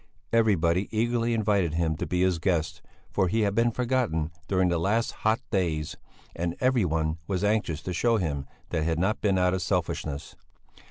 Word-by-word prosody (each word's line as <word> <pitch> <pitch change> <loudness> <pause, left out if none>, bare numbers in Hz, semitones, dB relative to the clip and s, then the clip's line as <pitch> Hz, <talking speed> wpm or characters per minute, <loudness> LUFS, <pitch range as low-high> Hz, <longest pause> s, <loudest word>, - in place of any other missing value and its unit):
Everybody 95 -5 +3
eagerly 115 +1 0
invited 100 -7 +1
him 80 -1 +1
to - - -3
be 90 0 +1
his 90 -3 +2
guest, 80 -2 0 0.3
for 95 - +2
he 110 +5 +1
had 100 -2 +1
been 115 +3 +3
forgotten 120 -10 0 0.2
during 95 -2 +2
the 85 -1 +1
last 105 +7 +1
hot 110 +1 0
days, 80 -7 -1 0.4
and 85 0 -2
everyone 85 -11 +1
was 95 -1 -1
anxious 100 -8 0
to 90 - -3
show 115 +5 +2
him 70 -8 -2 0.2
that 85 - -1
it - - 0
had 80 -1 0
not 95 +6 0
been 100 -3 +2
out 90 0 +3
of 95 - -1
selfishness. 75 -3 -2
95 Hz, 180 wpm, -27 LUFS, 80-110 Hz, 0.4 s, Everybody